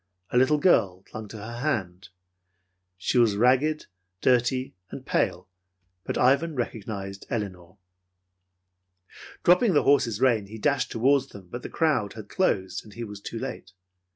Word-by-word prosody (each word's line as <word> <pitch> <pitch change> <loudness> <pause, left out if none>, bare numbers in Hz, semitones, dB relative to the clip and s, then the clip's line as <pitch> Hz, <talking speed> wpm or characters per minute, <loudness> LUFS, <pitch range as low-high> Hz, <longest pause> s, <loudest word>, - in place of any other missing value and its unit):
A - - +1
little 130 +4 +4
girl 100 - +3
clung 110 +1 -8
to 110 - -9
her 105 - -9
other 120 +2 -7
hand. 95 - -2 0.9
She 110 +6 +1
was 115 -4 +4
ragged, 130 +7 +2 0.3
dirty 130 +1 +1 0.2
and - - -9
pale; - - 0 0.6
but - - -2
Ivan 140 +5 +3
recognized 100 -5 -5
Elinor. 95 -6 -5 1.7
Dropping 180 +4 +5
the 145 - +4
horse's 120 -7 +3
rein, 120 -6 +2
he 110 +2 -9
dashed 135 +4 0
toward 135 +3 +2
them, 95 -3 -13
but 120 - -5
the - - -7
crowd 135 - +1
had 110 -2 -10
closed, 95 - 0
and 105 -2 -15
he 120 - -5
was 105 -2 -8
too 115 - -6
late. 110 -7 -6
115 Hz, 155 wpm, -26 LUFS, 100-135 Hz, 1.7 s, Dropping